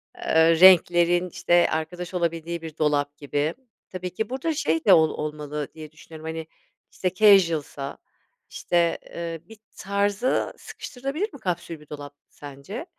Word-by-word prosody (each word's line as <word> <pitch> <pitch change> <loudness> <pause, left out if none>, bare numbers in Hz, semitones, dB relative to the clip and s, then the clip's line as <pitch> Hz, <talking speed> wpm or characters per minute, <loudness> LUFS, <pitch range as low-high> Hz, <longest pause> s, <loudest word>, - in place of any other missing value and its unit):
eee, 160 0 +3
renklerin 175 -1 +6
işte 175 +1 +2
arkadaş 175 +3 -4
olabildiği 170 -1 -2
bir 160 -1 -9
dolap 145 -1 0
gibi. 145 +2 -2 0.4
Tabii 185 -1 -5
ki 220 +3 -3
burada 265 +6 -2
şey 165 - -1
de 200 - +7
ol 160 -2 +5
olmalı 150 -1 -5
diye 155 -1 -10
düşünüyorum. 160 0 -13
Hani 160 0 -5 0.4
işte 185 -1 -2
casual'sa 170 -9 +3 0.5
işte, 170 -1 0
eee, 165 -1 -6
bir 225 - -13 0.2
tarza 200 +4 0
sıkıştırılabilir 280 - -5
mi 280 - -11
kapsül 175 -5 -4
bir 150 - -18
dolap 145 -1 -8 0.2
sence? 145 - -9
170 Hz, 140 wpm, -24 LUFS, 155-185 Hz, 0.5 s, de